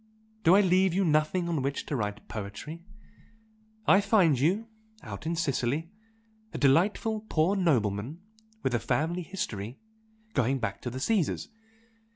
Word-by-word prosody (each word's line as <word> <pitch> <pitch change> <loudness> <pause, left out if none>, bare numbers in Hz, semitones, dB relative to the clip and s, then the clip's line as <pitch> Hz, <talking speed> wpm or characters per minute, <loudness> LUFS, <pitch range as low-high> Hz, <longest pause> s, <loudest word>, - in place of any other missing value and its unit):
Do 170 +3 +6
I 205 - +7
leave 185 -1 +3
you 195 0 +2
nothing 155 +3 +2
on 165 -4 0
which 140 +2 -2
to 145 - -3
write 105 -3 -3
poetry? 110 +11 -7 1.0
I 195 - +6
find 190 - +3
you 190 - +1 0.4
out - - -7
in 170 - 0
Sicily 150 +1 -1 0.6
a - - -5
delightful 200 - +2
poor 165 +5 +2
nobleman 125 - 0 0.4
with 130 - 0
a 120 - +2
family 160 +9 -1
history 120 - -5 0.6
going 135 +1 +2
back 100 -6 -4
to 125 - -3
the 130 +2 -6
Caesars! 195 +2 0
155 Hz, 145 wpm, -28 LUFS, 125-185 Hz, 1.0 s, I